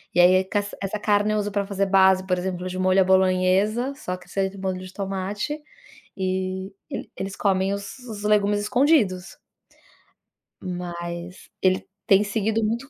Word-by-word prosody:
E - - +3
aí, 185 +2 +6
ca 205 +2 0 0.2
essa 195 +2 -3
carne 205 0 +2
eu 215 - +1
uso 205 0 -2
pra 200 0 -1
fazer 195 -1 0
base, 190 -1 +5
por 180 - +2
exemplo, 180 0 -3
de 185 0 -5
molho 185 +1 +3
à - - +6
bolonhesa, 190 +7 +2
só 185 -11 -5
que 180 - -17
esse 195 - -5
aí 190 - +2
de 195 - -13
molho 190 -1 -2
de 185 0 -9
tomate, 200 +9 -3 0.6
e 190 0 -2 0.2
ele - - -6
eles 195 +1 -5
comem 195 -1 +1
os 200 +5 -7
os 220 -5 -8
legumes 205 -1 +3
escondidos. 220 - +2 1.2
Mas 175 0 -6
ele 185 0 +2 0.2
tem 200 -1 +6
seguido 220 +1 0
muito 235 +5 -2
195 Hz, 170 wpm, -24 LUFS, 185-210 Hz, 1.2 s, aí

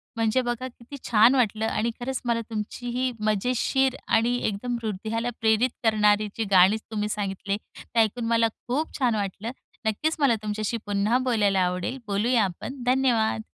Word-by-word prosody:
म्हणजे 225 +3 +2
बघा 240 +1 -3
किती 250 +2 -12
छान 230 +3 +6
वाटलं 220 -3 +1
आणि 225 +2 0
खरंच 260 +2 -3
मला 235 -1 +1
तुमची 220 +3 -5
ही 255 +1 0
मजेशीर 250 +5 +1
आणि 235 +2 +2
एकदम 230 +4 -2
हृदयाला 220 +3 -2
प्रेरित 220 +3 +3
करणारी 210 -1 +3
जी 225 - 0
गाणीच 190 +4 +5
तुम्ही 210 -1 -2
सांगितले, 200 -1 -2 0.2
ते 230 - -3
ऐकून 225 +2 +1
मला 230 0 +3 0.2
खूप 295 +6 -2
छान 245 -4 +2
वाटलं. 205 +3 -3 0.4
नक्कीच 305 +9 0
मला 270 -5 +4
तुमच्याशी 215 +2 -2
पुन्हा 205 +4 +1
बोलायला 205 -5 +2
आवडेल. 180 +8 -2
बोलूया 220 +3 +2
आपण. 245 +8 -6
धन्यवाद! 245 -4 +2
225 Hz, 155 wpm, -25 LUFS, 210-245 Hz, 0.4 s, छान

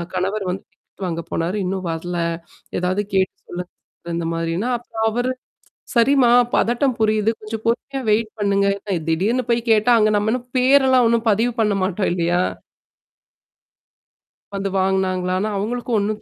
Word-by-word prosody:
கணவர் 195 +2 -1
வந்து 190 - -5
டிக்கெட் 195 - -11
வாங்கப் 170 -1 -5
போனாரு. 175 +5 -1
இன்னும் 185 -1 -3
வரல. 175 +2 -4 0.6
எதாவது 185 +3 0
கேட்டு 190 0 +2
சொல்லுங்க. 180 0 -6 0.5
இந்த 170 -1 -2
மாதிரின்னா, 165 +7 -2
அப்புறம் 225 -2 -4
அவரு, 245 +3 -1 0.6
"சரிம்மா. 245 +1 +5 0.2
பதட்டம் 245 +2 +1
புரியுது. 215 0 +2
கொஞ்சம் 220 +1 -6
பொறுமையா 270 +3 -1
வெயிட் 220 +1 +1
பண்ணுங்க." 200 -1 +2 0.4
திடீர்னு 220 +10 +1
போய் 235 - +2
கேட்டா, 220 +3 +4
அங்க 215 0 +3
நம்ம 215 +2 +1
இன்னும் 245 0 -4
பேர் 265 +2 +5
எல்லாம் 255 -2 +5
ஒண்ணும் 230 0 +1
பதிவு 230 +4 +1
பண்ண 210 -2 +2
மாட்டோம், 190 +1 0
இல்லையா? 175 0 +1 2.1
வந்து 195 0 -2
வாங்குனாங்களான்னு 185 +1 0
அவங்களுக்கு 240 +5 -3
ஒண்ணும் 210 +1 -2
210 Hz, 140 wpm, -21 LUFS, 185-235 Hz, 2.1 s, சரிம்மா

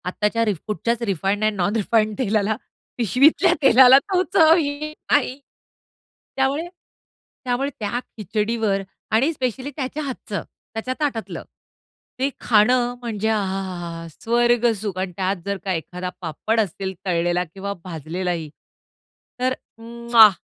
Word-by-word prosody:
आत्ताच्या 210 +5 0
रिफूडच्याच 215 +4 -2
refined 195 +1 0
and 215 0 +2
non 200 +4 0
refined 215 -1 +1
तेलाला, 215 -3 +1 0.4
पिशवीतल्या 250 - +4
तेलाला 265 0 +8
तो 365 +5 0
चव 320 0 +7
येत 305 0 -3 0.2
नाही. 270 -1 +2 1.0
त्यामुळे 275 +5 0 0.8
त्यामुळे 255 +3 0
त्या 215 +3 -1 0.2
खिचडीवर 210 0 0 0.3
आणि 260 +9 +3
स्पेशली 260 0 -3
त्याच्या 295 +2 -3
हातचं, 265 -3 -5 0.3
त्याच्या 225 +3 -3
ताटातलं, 225 - -2 0.8
ते 270 +2 +2
खाणं 245 +2 +3
म्हणजे 220 -3 -2
आ! 220 - +2
हा! 190 0 -2
हा! 185 -1 -5
हा! 170 -1 -6
हा! 165 - -8
स्वर्ग 240 0 +3
सुख 205 -4 -4
आणि 190 -1 -2
त्यात 190 0 0
जर 200 0 -1
का 190 - 0
एखादा 180 +2 -4
पापड 185 +7 -1
असेल 190 -1 -2
तळलेला 175 0 +1
किंवा 200 +1 -4
भाजलेला 175 +1 -4
ही 165 -3 -4 0.9
तर 255 +1 +1 0.2
उम्मअहा 235 -1 +5
220 Hz, 135 wpm, -22 LUFS, 190-255 Hz, 1.0 s, तेलाला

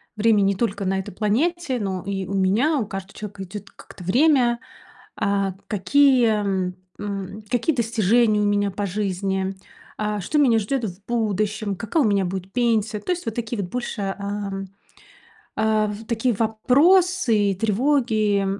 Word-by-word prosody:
Время 215 -1 +3
не 195 0 +2
только 200 -1 -1
на 190 +1 0
этой 190 - -7
планете, 260 - 0
но 190 -3 -3
и 195 -1 -3
у 190 - -6
меня. 205 +11 +2
У 220 - -2
каждого 195 -1 -7
человека 205 -2 -7
идёт 200 +1 -9
как-то 185 - -13
время. 245 - +3 0.6
А 200 -2 0
какие 255 +4 +4
м 190 -3 -1 0.8
какие 245 +6 +1
достижения 225 -2 +2
у - - +2
меня 205 0 +1
по 200 +1 -3
жизни? 190 0 -2 0.4
А 210 -1 -1
что 300 - -1
меня 250 -6 +4
ждёт 240 +4 -2
в 195 -1 -6
будущем? 215 -2 -1
Какая 230 - 0
у - - +3
меня 200 -2 +2
будет 190 +1 -5
пенсия? 225 -3 +1
То - - -5
есть 355 -5 -4
вот 225 - -2
такие 230 -1 -3
вот 180 -2 -4
больше 240 -4 -4
а, 200 +1 -3 1.1
а 215 -1 +1 0.2
такие 235 +1 0
вопросы 250 - +3
и - - -2
тревоги 220 -2 +1
210 Hz, 155 wpm, -23 LUFS, 195-240 Hz, 1.1 s, какие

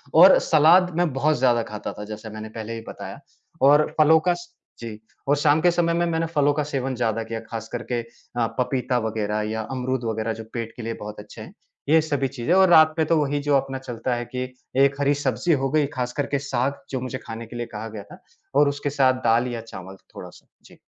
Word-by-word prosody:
और 180 +4 +9
सलाद 170 +4 +5
मैं 175 -3 +2
बहुत 150 +3 +1
ज़्यादा 120 -2 +3
खाता 105 -1 -6
था, 105 - -8
जैसे 110 +1 -8
मैंने 110 0 -8
पहले 110 +1 -6
ही 115 - -6
बताया - - -8 0.4
और 145 +3 +6
फलों 160 +1 +6
का 180 +3 +1
स 350 - -10 0.3
जी 115 - -6 0.4
और 145 - +5
शाम 145 +1 +3
के 175 - +5
समय 170 -1 +1
में 170 +1 +1
मैंने 165 -1 0
फलों 145 -3 +2
का 150 +1 -1
सेवन 135 -2 -2
ज़्यादा 115 -2 -1
किया 115 0 -5
ख़ास 115 -1 -7
करके 120 0 -2 0.4
आ, 115 -1 +2
पपीता 125 0 0
वग़ैरह 110 -1 -2
या 110 0 -2
अमरूद 130 -1 -2
वग़ैरह 110 0 -2
जो 110 0 -8
पेट 115 -1 -4
के 120 - -6
लिए 115 +1 -3
बहुत 105 0 -7
अच्छे 105 +2 -11
हैं 160 - -11 0.4
ये 160 +1 +6
सभी 145 -3 -1
चीज़ें, 135 +4 -1
और 190 -1 +6
रात 155 -2 +7
में 160 - +3
तो 165 - +3
वही 145 0 0
जो 145 0 +2
अपना 135 0 -3
चलता 125 -1 -3
है, 120 0 -4
कि 125 +2 -4 0.4
1 140 0 -1
हरी 145 0 +3
सब्ज़ी 145 +4 0
हो 135 -2 0
गई 155 -1 +3
ख़ासकर 125 +3 -2
के 140 - -1
साग, 135 0 -2
जो 130 - -2
मुझे 130 0 -4
खाने 115 +1 -7
के 120 - -11
लिए 120 - -3
कहा 110 +2 -5
गया 105 -2 -8
था - - -12 0.4
और 145 0 +5
उसके 145 0 -3
साथ 130 -2 +2
दाल 115 +2 +3
या 115 - -4
चावल 95 -4 -10 0.2
थोड़ा-सा, - - -11 0.2
जी। - - -17
130 Hz, 230 wpm, -23 LUFS, 115-150 Hz, 0.4 s, और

